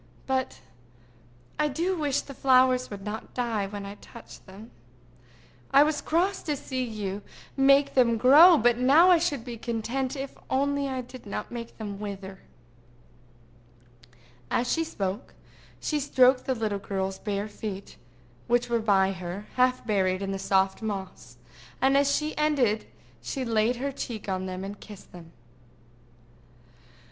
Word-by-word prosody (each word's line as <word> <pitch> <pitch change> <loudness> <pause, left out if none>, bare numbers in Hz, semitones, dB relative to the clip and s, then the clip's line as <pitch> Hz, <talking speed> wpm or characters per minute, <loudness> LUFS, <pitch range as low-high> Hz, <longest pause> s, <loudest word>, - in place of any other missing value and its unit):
"But 260 -1 -2 1.0
I 300 - +3
do 335 +6 -1
wish 290 -5 0
the 275 - -10
flowers 255 -1 +3
would 200 -1 -8
not 215 +3 -7
die 230 -5 -1
when 200 0 -7
I 200 +1 -8
touch - - -13
them. 200 +5 -13 1.0
I 280 +1 +7
was 300 0 -1
cross 370 +5 0
to 300 - -2
see 260 -2 -3
you 210 -4 -4 0.3
make 275 +1 +4
them 235 -3 +3
grow, 305 +9 +8
but 240 0 +2
now 300 +8 +6
I 350 - +6
should 290 -8 -2
be 240 -2 -6
content 240 +4 -3
if 270 0 -6
only 280 +1 0
I 260 -1 -3
did 250 -2 -12
not 200 - -5
make 235 -1 -7
them 205 -3 -6
wither." 195 -2 -7 2.1
As 245 +1 0
she 330 - +1
spoke, 200 -11 -5 0.4
she 300 - -1
stroked 260 -2 +3
the 260 - 0
little 215 -3 -2
girl's 190 -1 -3
bare 205 -1 -3
feet, 205 -2 -7 0.5
which 240 0 +1
were 235 - +2
by 195 -3 +3
her, 185 +2 -6
half 255 0 +2
buried 190 -3 0
in 195 - -3
the 195 - -3
soft 190 +1 +1
moss, 190 - -6 0.4
and 265 +1 +3
as 280 0 +3
she 305 +2 -1
ended 270 -8 +1 0.3
she 265 -3 -4
laid 225 +1 +1
her 275 +3 -3
cheek 235 -6 -6
on 190 -1 -2
them 185 0 -5
and 200 +1 -7
kissed 205 -3 -13
them. 170 -2 -13
235 Hz, 155 wpm, -27 LUFS, 200-270 Hz, 2.1 s, grow